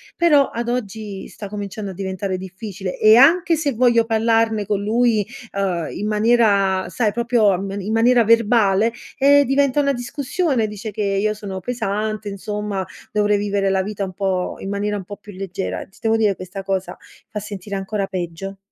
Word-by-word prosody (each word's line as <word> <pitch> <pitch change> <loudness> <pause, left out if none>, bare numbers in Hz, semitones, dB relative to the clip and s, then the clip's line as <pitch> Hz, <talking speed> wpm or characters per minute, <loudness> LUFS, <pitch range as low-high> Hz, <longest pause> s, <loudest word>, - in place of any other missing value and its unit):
però 300 -5 +4
ad 235 +1 -3
oggi 215 -4 -4
sta 205 - -9
cominciando 205 -1 -5
a - - -8
diventare 190 0 -3
difficile 190 0 -6
e 215 +1 +7
anche 330 +6 +5
se 290 -4 0
voglio 235 -1 +3
parlarne 225 -1 +1
con 200 0 -1
lui, 225 0 +2 0.3
uhm, 185 -5 -1
in 210 - -4
maniera 210 -4 +3
sai 220 -4 0
proprio 235 -2 +2
um 195 +1 -1
in 200 +3 -4
maniera 235 +1 +4
verbale, 225 -1 +3 0.3
eh, 285 +1 +6
diventa 280 +1 +2
una 280 0 +1
discussione, 265 +1 -1
dice 210 +1 -6
che 210 +1 -3
io 200 +2 +1
sono 195 -3 -6
pesante, 215 -2 -3
insomma, 205 -1 -3 0.3
dovrei 210 -1 +2
vivere 200 -1 0
la 190 0 +1
vita 205 0 -4
un 185 -1 -5
po' 185 -2 -1
in 195 - -6
maniera 205 +1 -1
un 195 - -6
po' 205 0 -8
più 205 0 -13
leggera. 165 - -4
Ti 195 - -23
devo 225 0 +2
dire, 210 -3 +2
questa 185 +1 -7
cosa 190 -1 -3 0.3
fa 215 -2 -4
sentire 200 -1 -6
ancora 195 0 -2
peggio. 185 +1 -5
210 Hz, 175 wpm, -20 LUFS, 195-230 Hz, 0.3 s, e